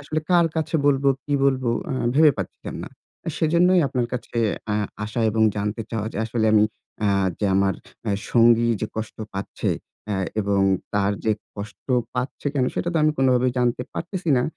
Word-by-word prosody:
আসলে 155 +2 -2
কার 175 -2 +5
কাছে 160 0 -2
বলবো? 140 -1 +3 0.2
কি 145 - -4
বলবো? 130 -3 +2 0.2
আ - - -1 0.2
ভেবে 155 +1 +7
পাচ্ছিলাম 95 - -6
না। - - -8 0.5
সেজন্যই 175 +3 +4
আপনার 125 -3 -1
কাছে 125 -1 -5 0.3
অ্যা 105 -1 0 0.3
আসা 110 +2 -3
এবং 110 +1 +1
জানতে 105 +3 -2
চাওয়া 110 -2 -2
যে - - -7
আসলে 110 0 0
আমি 105 -1 +6 0.4
আ - - +3 0.3
যে 105 - +1
আমার 95 -1 +2 0.3
এ 100 - +2 0.2
সঙ্গী 115 0 +5
যে 110 - -1
কষ্ট 110 0 -4 0.2
পাচ্ছে 100 - -2 0.7
এবং 100 -1 +1 0.2
অ্যা - - -15
তার 100 0 +2
যে 110 - +3 0.2
কষ্ট 100 +2 -8 0.3
পাচ্ছে 125 +3 -3
কেন? 130 - +2
সেটা - - -1
তো - - -1
আমি 155 0 +4
কোনভাবেই 130 -1 +3
জানতে 125 0 +1
পারতেছি 175 0 -3
না। 125 - +2
120 Hz, 175 wpm, -23 LUFS, 110-145 Hz, 0.7 s, ভেবে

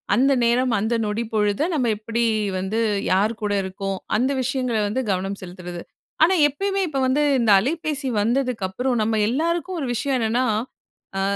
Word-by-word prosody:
அந்த 270 +3 +3
நேரம், 240 +1 +2
அந்த 220 +3 0
நொடி 210 +3 -1
பொழுத 210 0 +1
நம்ப 255 -6 +1
எப்படி 230 +2 -2 0.3
வந்து, 190 +4 -2 0.3
யார் 200 +4 +3
கூட 205 -1 -1
இருக்கோம். 195 +1 -4 0.2
அந்த 250 +5 +2
விஷயங்கள 255 -2 -1
வந்து 255 +6 -1
கவனம் 195 +1 -2
செலுத்துறது. 180 -1 -8 0.4
ஆனா 345 +4 +5 0.2
எப்பயுமே, 390 +7 -2
இப்ப 280 -3 -2
வந்து 270 +3 +2 0.2
இந்த 230 -3 +3
அலைபேசி 295 +3 -2
வந்ததுக்கு 240 -2 0
அப்புறம் 245 +4 -1
நம்ப 220 +1 +1
எல்லாருக்கும் 335 +6 -1
ஒரு 275 - -3
விஷயம் 270 +3 -1
என்னன்னா, 235 +3 +1 0.7
அ - - 0
235 Hz, 160 wpm, -22 LUFS, 205-270 Hz, 0.7 s, ஆனா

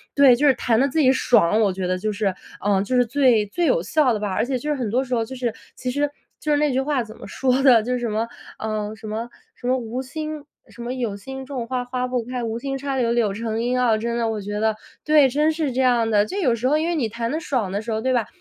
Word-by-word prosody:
对， 280 -3 +7
就 295 - +3
是 275 - +6
弹 235 -2 +1
得 275 - +4
自 315 +4 -1
己 260 -2 +5
爽， 220 -6 +3
我 200 -3 +2
觉 185 0 -3
得 185 0 0
就 215 +3 -2
是， 200 -2 0 0.3
呃， 200 -1 +2
就 255 +5 -2
是 245 0 +4
最 245 -3 +3
最 340 - -1
有 - - +3
效 295 -6 +2
的 215 - -2
吧。 205 -1 -2
而 215 +4 +1
且 260 0 -1
就 295 +5 -5
是 300 - +1
很 245 -5 -2
多 250 +5 +1
时 255 -1 -5
候 230 -2 +1
就 260 - -8
是 245 -3 -2 0.2
其 255 - -3
实 290 +2 0 0.3
就 305 - -5
是 295 - +4
那 295 0 +2
句 260 - +1
话 275 -2 0
怎 220 0 -12
么 - - -10
说 260 0 +1
的？ 245 -5 +6
就 245 - -3
是 250 - -1
什 240 - -2
么， 220 +2 -1 0.3
呃， 215 -1 -3
什 215 0 -10
么， 225 +3 -4 0.3
什 245 - -7
么 255 +1 +3
无 240 +1 -4
心 305 +3 -6 0.3
什 240 - -12
么 240 +1 -3
“有 235 -6 -2
心 265 +5 -8
种 255 -4 -5
花 255 0 -2
花 250 0 -2
不 250 -1 -1
开， 250 +1 -4
无 225 0 -2
心 270 +2 -3
插 275 0 -3
柳 235 -2 +1
柳 230 -4 +1
成 225 +1 -3
荫” 245 +1 0
啊， 235 -3 +3
真 235 +2 -2
的 230 -1 0
我 220 -1 -2
觉 205 +1 -4
得 220 -1 +2 0.3
对， 300 -2 +5
真 300 +4 +2
是 310 -3 -1
这 260 - +1
样 240 -3 +3
的， 205 -2 +3
就 385 - -5
有 255 -11 +2
时 235 +2 -1
候 300 - +3
因 320 +2 0
为 345 - 0
你 265 -8 0
弹 230 +1 -3
得 310 - -1
爽 255 - -1
的 200 +2 -2
时 225 +1 -5
候， 220 - 0
对 260 +2 +1
吧？ 235 -4 +1
245 Hz, 315 characters per minute, -22 LUFS, 220-270 Hz, 0.3 s, 对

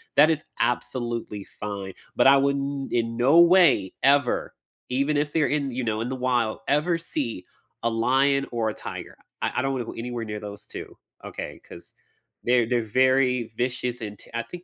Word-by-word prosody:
That 155 - +7
is 155 -2 0 0.2
absolutely 120 -4 -2
fine. 100 -2 -5 0.2
But - - +5
I 140 0 +8
wouldn't, 140 0 -1
in 115 -1 0
no 135 +7 +5
way, 170 - +5
ever, 140 -1 +2 0.4
even 140 +4 +1
if 145 0 -1
they're 155 -3 +3
in, 140 0 -1
you 125 +1 -3
know, 110 -2 -1
in 115 - -2
the 130 - -3
wild, 125 -3 0
ever 160 +4 +2
see 130 - -4 0.4
a 115 - +2
lion 135 +4 +2
or 115 -2 0
a - - -4
tiger. - - -8 0.2
I - - 0
I - - +3
don't 135 - 0
wanna 125 -3 -2
go - - -7
anywhere 120 0 -4
near 105 -1 -5
those 105 0 -9
2, - - -9 0.3
okay? - - -7
'Cause - - -12 0.5
they're 120 -1 +3
they're 120 -2 +1
very 130 +1 +2
vicious 125 0 -2
and 105 -2 -6 0.2
I 115 - -1
think 180 0 -10
125 Hz, 185 wpm, -25 LUFS, 115-140 Hz, 0.5 s, I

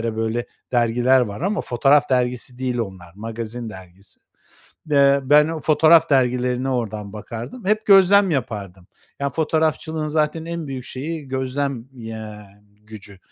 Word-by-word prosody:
böyle 115 +2 -2 0.3
dergiler 120 +2 +3
var 105 0 -4
ama 195 +2 -1
fotoğraf 135 +4 +2
dergisi 125 -1 -1
değil 125 -1 -2
onlar, 95 -6 -6
magazin 115 +2 -6
dergisi. 95 0 -14 0.7
Eee, 140 -1 +4
ben 150 +3 +5
o 160 -1 -4
fotoğraf 160 +2 +4
dergilerine 125 -1 +1
oradan 110 -5 -3
bakardım. 115 - -8
Hep 215 +2 +1
gözlem 195 0 +6
yapardım. 100 - -4 0.3
Ya, 140 0 -1
fotoğrafçılığın 160 +1 -1
zaten 155 +1 -1
en 170 -1 -5
büyük 130 -2 -6
şeyi 150 +3 -6
gözlem, 130 -1 -3
ya, 110 -3 -9 0.3
gücü. 105 -2 -12
130 Hz, 130 wpm, -21 LUFS, 110-150 Hz, 0.7 s, gözlem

